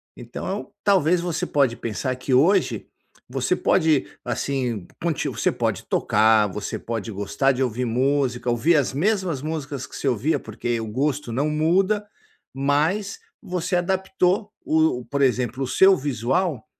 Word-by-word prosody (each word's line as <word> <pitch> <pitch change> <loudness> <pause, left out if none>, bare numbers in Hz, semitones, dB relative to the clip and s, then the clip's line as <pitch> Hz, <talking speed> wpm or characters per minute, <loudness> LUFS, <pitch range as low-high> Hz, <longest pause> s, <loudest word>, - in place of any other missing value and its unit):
Então, 180 - -6
talvez 180 -3 +3
você 175 -2 -2
pode 135 -5 +1
pensar 120 +3 -3
que 130 +1 -3
hoje 160 +11 +3 0.4
você - - 0
pode, 160 -5 +2 0.2
assim, 125 -5 -2 0.2
conti 165 -4 -1
você - - 0
pode - - -2
tocar, 110 -1 +3
você 105 +2 -5
pode 115 -1 -4
gostar 100 +7 0
de 130 0 -3
ouvir 125 0 -1
música, 125 0 0
ouvir 130 +9 +3
as 140 -3 +1
mesmas 180 -3 0
músicas 145 -4 -4
que - - -12
se - - -3
ouvia, 130 +5 +1
porque 115 +2 -3
o 110 - -5
gosto 135 +2 -1
não 140 +6 0
muda, 190 +7 +1 0.5
mas 155 +9 0 0.2
você 180 +1 -2
adaptou 190 +2 0
o 155 -6 +2
por 140 0 -2
exemplo, 130 0 +1
o 130 - -2
seu 190 +7 +5
visual 135 0 -1
140 Hz, 145 wpm, -23 LUFS, 120-170 Hz, 0.5 s, seu